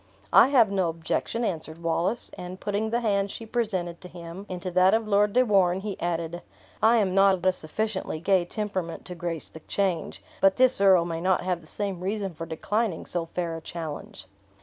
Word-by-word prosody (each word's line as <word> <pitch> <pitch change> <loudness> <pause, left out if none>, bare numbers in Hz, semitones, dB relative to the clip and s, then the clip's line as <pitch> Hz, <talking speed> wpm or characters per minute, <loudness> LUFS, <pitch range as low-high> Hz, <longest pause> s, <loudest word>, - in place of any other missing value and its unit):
"I - - +8
have 245 -7 +4
no 190 -4 +1
objection," 165 +8 -2
answered 165 -3 -4
Wallace; 170 +7 0
and 180 +1 -8
putting 205 +2 -1
the 235 +2 0
hand 200 -3 +1
she 225 - -7
presented 195 -7 -2
to 180 - -9
him 175 +3 -9
into 185 0 -4
that 185 +3 +5
of 225 -1 -1
Lord 205 0 +3
de 255 +1 +4
Warenne, 190 -4 +3
he 205 -1 -4
added, 170 0 -2 0.4
"I 225 +2 +5
am 195 -4 +1
not 195 0 +5
of 185 0 -9
a 185 - +4
sufficiently 190 +1 -3
gay 190 +1 +3
temperament 190 -3 -4
to 180 - -6
grace 170 -2 -4
the 160 - -11
change; 180 0 -2 0.2
but 195 0 +5
this 255 -4 +5
earl 190 -4 +6
may 165 -1 -4
not 185 0 +2
have 180 -2 -1
the 160 - -15
same 195 0 -3
reason 195 0 -3
for 165 +1 -7
declining 205 +3 -2
so 170 -2 -3
fair 170 -1 -3
a 165 - -7
challenge!" 160 - -7
185 Hz, 200 wpm, -26 LUFS, 170-205 Hz, 0.4 s, I